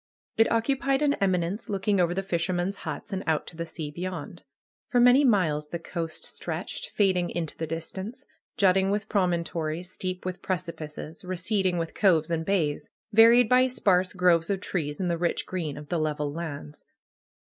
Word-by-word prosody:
It 225 - +3
occupied 270 +4 +1
an 285 -1 +3
eminence 185 +1 0
looking 200 0 +1
over 175 0 +2
the 195 - -1
fishermen's 180 +1 -1
huts, - - -6
and 190 +1 -2
out 160 -1 +1
to - - -11
the 170 0 -4
sea 155 -3 -6
beyond. 175 0 -6 0.5
For 245 - +3
many 250 +4 +6
miles 165 - +2
the 170 - -3
coast 165 -1 -5
stretched, - - -5
fading 185 -4 +2
into 165 -3 -4
the 160 - -4
distance; 190 +8 -5 0.3
jutting 190 0 +4
with 205 +1 -1
promontories, 170 -2 -1
steep 185 -1 -4
with 185 -1 -4
preci 180 -2 -3
pices, 155 +2 -8
receding 185 0 0
with 165 -1 -3
coves 170 -5 +3
and 165 -1 0
bays; 160 -6 0 0.2
varied 230 +2 +7
by 255 +2 +5
sparse 185 -7 +2
groves 180 -2 +3
of 195 -1 0
trees, 150 -6 -3
and 185 - 0
the 170 - -1
rich 175 0 0
green 165 -6 -4
of 150 0 -10
the 175 - 0
level 150 -2 -1
lands. 145 - -6
180 Hz, 175 wpm, -27 LUFS, 165-200 Hz, 0.5 s, varied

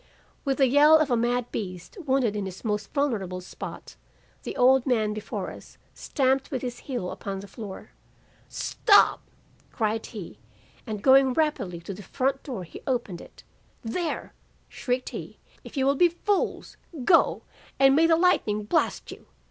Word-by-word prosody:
"With 275 -2 0
the 270 - +5
yell 295 +4 +7
of 310 -4 0
a - - +4
mad 240 +1 0
beast 185 -4 -6
wounded 260 -5 +2
in 200 -2 -2
his 190 +4 -10
most 210 -1 -2
vulnerable 210 -11 -1
spot, 180 - -9 0.4
the - - -6
old 260 +1 +4
man 220 -4 +1
before 215 0 -5
us - - -13 0.2
stamped 265 -1 0
with 265 -4 -4
his 245 -1 -4
heel 245 -10 -4
upon 195 -1 -5
the 200 - -9
floor. 200 -1 -9 0.6
"'Stop!' 410 -4 +3 0.5
cried 220 -1 -1
he; 170 - -9 0.5
and 210 -2 -5
going 265 -1 +6
rapidly 245 - -1
to 195 - -6
the 200 - -10
front 270 +7 -1
door 245 -10 -6
he 170 - -11
opened 240 -9 -2
it. - - -15 0.4
'There!' 315 +9 -3 0.3
shrieked 250 0 -3
he, - - -8 0.3
'if - - -11
you 265 - +2
will 275 - +4
be 350 +5 +5
fools, 385 +4 -2 0.3
go! 335 - +4 0.3
and 270 0 +5
may 325 +2 +5
the 330 - +5
lightning 320 - +2
blast 320 +11 0
you. - - -12
245 Hz, 165 wpm, -26 LUFS, 210-275 Hz, 0.6 s, yell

